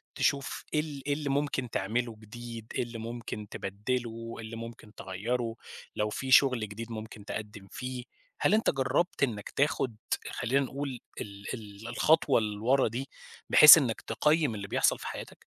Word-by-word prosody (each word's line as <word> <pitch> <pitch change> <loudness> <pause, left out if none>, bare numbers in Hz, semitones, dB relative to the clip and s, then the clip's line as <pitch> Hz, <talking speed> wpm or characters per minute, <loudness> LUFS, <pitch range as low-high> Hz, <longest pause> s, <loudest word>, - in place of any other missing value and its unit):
تشوف 140 -1 0
إيه 150 - +3
ال 150 -3 -4
إيه 145 - +2
اللي 145 -1 -3
ممكن 140 -2 0
تعمله 115 +3 -1
جديد؟ 115 +1 -9
إيه - - +1
اللي 120 -1 -7
ممكن 115 -2 -6
تبدّله؟ 115 +3 -4
اللي 115 0 -7
ممكن 115 -1 -9
تغيّره؟ 115 +5 -3 0.4
لو 105 0 0
في 130 +5 -4
شغل 125 -5 +5
جديد 115 +3 -7
ممكن 110 -2 -8
تقدّم 105 -2 -6
فيه؟ 125 -1 -5 0.4
هل - - +3
أنت 220 +1 +4
جرّبت 135 +5 0
إنَّك 110 -6 -1
تاخد 135 -4 0 0.4
خلّينا 135 +4 +1
نقول 135 -1 -5 0.2
ال 100 0 -8
ال 105 -2 -8
الخطوة 140 +3 +3
اللي 105 -2 -3
ورا 130 +5 +3
دي 125 +5 -4 0.4
بحيث 150 +2 +11
إنَّك 125 -8 0
تقيّم 150 +1 +1
اللي 100 -1 -5
بيحصل - - +2
في - - -6
حياتك؟ - - -8
120 Hz, 160 wpm, -29 LUFS, 110-135 Hz, 0.4 s, بحيث